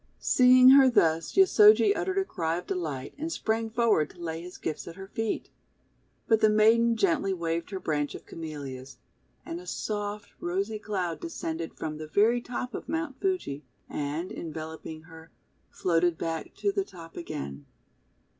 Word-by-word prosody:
Seeing 255 0 +6
her 270 -1 +8
thus, 165 -8 +2
Yosojl* 220 - +6
uttered 380 - -2
a 385 - +2
cry 165 - -2
of 180 - -6
delight, 150 -7 -4
and 320 +2 -3
sprang 225 -5 -1
forward 220 -10 +2
to - - -17
lay 165 -1 -4
his 180 +1 -10
gifts 155 - -4
at 170 - -8
her 195 0 -8
feet. 225 +2 -3 0.8
But 225 -1 +3
the 215 - +6
maiden 225 +2 +4
gently 305 - +1
waved 170 -1 -2
her 195 - -4
branch 145 -4 -2
of - - -10
Camellias, 140 -5 -8 0.5
and 165 - -5
a 180 - -12
soft, 205 +1 -4
rosy 195 +5 -2
cloud 185 -5 -3
descended 165 - -5
from 155 -1 -5
the 155 - -6
very 225 +8 +3
top 245 0 -5
of - - -7
Mount 320 -4 -3
Fuji, 365 - -1 0.2
and, 150 +5 -3
enveloping 160 0 -7
her, 160 0 -14 0.4
floated 170 -1 +1
back 165 -1 -4
to 405 - 0
the 395 0 0
top 165 - -13
again. 70 - -6
180 Hz, 165 wpm, -28 LUFS, 160-230 Hz, 0.8 s, her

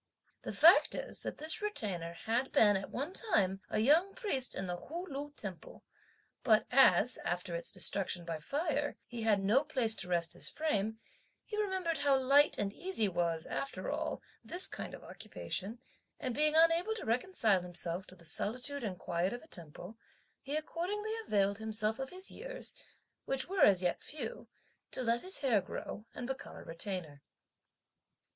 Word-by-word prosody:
The - - -5
fact - - +7
is - - -6
that - - -5
this 315 +5 0
Retainer 195 - -1
had 235 +8 -1
been 205 -2 +5
at 195 - -3
one 285 +8 -4
time 195 - +1
a - - -1
young 315 - +4
priest 395 - -2
in 195 - -3
the 180 -1 -3
Hu 335 - -6
Lu 290 -1 -5
temple; 190 - -6 0.6
but 215 -3 +4
as, 255 -1 +5
after 175 0 -2
its 170 - -3
destruction 185 -3 -1
by 165 -2 -4
fire, 290 - -1
he 240 -1 -6
had 210 -3 +3
no 225 +9 +4
place 255 -8 +2
to 185 - -4
rest 170 -2 +2
his - - -3
frame, 220 -9 -1 0.5
he 425 - -6
remembered 380 -6 -1
how 280 -2 +4
light 275 +3 +5
and 200 -1 -1
easy 355 - 0
was, 170 -3 0
after 275 - -3
all, - - -3 0.2
this 360 +2 +2
kind - - -4
of - - -13
occupation, 205 +5 -5 0.4
and 255 -3 -2
being 305 +4 +3
unable 330 +6 +4
to 445 - -6
reconcile 230 - +2
himself 175 +1 -1
to 185 - -10
the 170 -2 -16
solitude 250 - 0
and 195 -5 -3
quiet 175 +5 -1
of 245 - -7
a - - -15
temple, 175 - -8 0.4
he 280 +2 -4
accordingly 370 +7 -2
availed 200 0 +2
himself 220 0 -1
of 265 0 -3
his 370 +1 -3
years, - - -4 0.5
which 270 0 -1
were 380 +1 -1
as 190 -2 +6
yet 175 - 0
few, 250 -6 -6 0.4
to 255 - -3
let 235 0 +1
his 375 -3 +1
hair 240 -8 +3
grow, 205 +3 -7
and 250 - -5
become 265 +1 -6
a - - -10
retainer. 165 -4 -4
235 Hz, 175 wpm, -33 LUFS, 190-305 Hz, 0.6 s, fact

